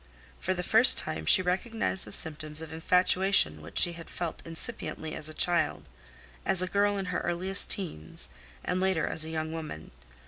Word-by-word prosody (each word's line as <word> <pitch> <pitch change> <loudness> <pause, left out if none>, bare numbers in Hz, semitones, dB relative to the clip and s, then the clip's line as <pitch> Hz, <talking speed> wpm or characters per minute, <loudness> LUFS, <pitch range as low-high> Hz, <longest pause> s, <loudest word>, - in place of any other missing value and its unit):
For 185 - -1
the 180 - -3
first 225 +6 +6
time 155 - -3
she 185 - +7
recognized 190 +2 -1
the - - -10
symptoms 155 -1 -2
of 160 -1 -6
infatuation 180 - +2
which 75 - -9
she 175 - +4
had 165 -1 -10
felt 170 -2 -4
incipiently 160 -1 -2
as 155 - -3
a - - -7
child, 175 -1 +1 0.6
as 185 -1 +3
a - - -1
girl 205 +1 +2
in 195 - -2
her - - +1
earliest 185 +3 0
teens, 80 - -3 0.3
and 180 - 0
later 190 -4 +2
as 160 - -1
a - - -6
young 160 0 -3
woman. 155 - -7
175 Hz, 180 wpm, -29 LUFS, 160-190 Hz, 0.6 s, she